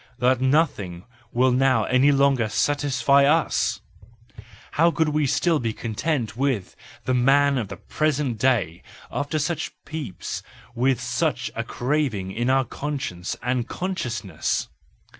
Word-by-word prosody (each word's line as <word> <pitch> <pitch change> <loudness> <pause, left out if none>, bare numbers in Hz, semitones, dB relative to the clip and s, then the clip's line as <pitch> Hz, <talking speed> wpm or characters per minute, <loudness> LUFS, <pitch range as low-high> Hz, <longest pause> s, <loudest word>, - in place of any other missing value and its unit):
that 130 0 +2
nothing 130 - +1 0.3
will 130 +2 +3
now 130 -3 +3
any 130 +5 +4
longer 135 -5 +3
satisfy 140 +1 +2
us! 155 +3 +2 0.9
How 165 +3 +4
could 160 -2 +1
we 150 -1 +1
still 165 +4 +2
be 115 -3 -2
content 115 +2 -2
with 130 -7 -1 0.3
the 130 - +1
man 140 +3 +4
of 110 - -3
the 100 - -8
present 145 -6 -1
day 105 -10 +1 0.3
after 145 +2 -2
such 155 +1 -2
peeps, 150 - -5 0.3
and 120 - -7
with 130 -2 +3
such 120 -1 -1
a - - -3
craving 125 -8 -1
in 120 +5 -1
our 135 0 +3
conscience 130 -12 -4
and 125 -1 0
consciousness 120 - -3
130 Hz, 135 wpm, -24 LUFS, 115-145 Hz, 0.9 s, any